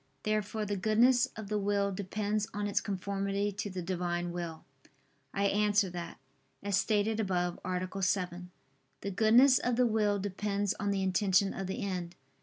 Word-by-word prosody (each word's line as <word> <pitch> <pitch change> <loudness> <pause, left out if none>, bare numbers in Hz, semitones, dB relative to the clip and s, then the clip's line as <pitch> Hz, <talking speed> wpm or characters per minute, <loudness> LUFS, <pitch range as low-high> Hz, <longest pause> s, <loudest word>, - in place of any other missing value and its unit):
Therefore 215 0 -1
the 205 0 -2
goodness 235 +6 +4
of 220 -2 -7
the 210 +1 -1
will 200 0 +1
depends 205 +2 -2
on 205 0 -1
its 205 - +1
conformity 200 +1 -2
to 205 +1 -4
the 185 -2 -5
Divine 175 -1 -2
will. 170 -2 -6 0.7
I 200 - -1
answer 205 -1 +2
that, 175 -1 -6 0.5
As 200 -1 0
stated 215 +2 +1
above 180 -4 -1
(A. 185 +1 -3
7), 180 -1 -1 0.5
the 200 - -3
goodness 235 +6 +6
of 245 -1 0
the 250 +1 +3
will 215 -3 +2
depends 200 +1 -1
on 205 - -1
the 195 -1 0
intention 190 +1 +2
of 195 - -4
the 200 +5 -4
end. 180 -3 -4
200 Hz, 165 wpm, -31 LUFS, 185-210 Hz, 0.7 s, goodness